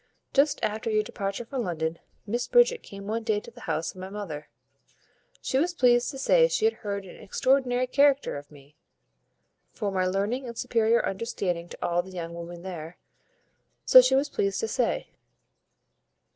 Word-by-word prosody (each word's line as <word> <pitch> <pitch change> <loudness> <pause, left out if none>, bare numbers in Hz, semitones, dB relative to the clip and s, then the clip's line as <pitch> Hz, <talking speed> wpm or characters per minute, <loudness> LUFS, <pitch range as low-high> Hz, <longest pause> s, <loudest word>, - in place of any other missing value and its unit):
Just 280 +2 +3
after 215 +2 -1
your 215 -1 +2
departure 200 +1 -4
for 265 +2 -5
London, 165 -6 -2 0.3
Miss 240 +4 -2
Bridget 485 0 +4
came 200 0 -10
one 220 +3 -2
day 220 -2 0
to 235 - -13
the 240 - -15
house 160 0 -1
of 185 - -11
my 190 - -6
mother. 180 -8 -6 0.9
She 260 - +1
was 350 +4 0
pleased 245 -5 +4
to 275 - -7
say - - +4
she 440 - 0
had 450 - +4
heard 200 -2 -4
an 180 - -12
extraordinary 255 +3 +1
character 280 +2 +3
of 145 0 -8
me, 145 0 -17 1.0
for 205 -3 -3
my 185 -1 +1
learning 205 +8 -1
and 235 -1 -8
superior 230 -1 +2
understanding 185 -4 -3
to - - -6
all 175 0 +1
the 185 - -13
young 170 -2 -6
women 170 0 -8
there, 175 -2 -7 0.9
so 255 - +10
she 255 +1 +3
was 275 +2 +2
pleased 400 +5 -1
to 450 - -1
say. - - -1
215 Hz, 175 wpm, -27 LUFS, 185-255 Hz, 1.0 s, so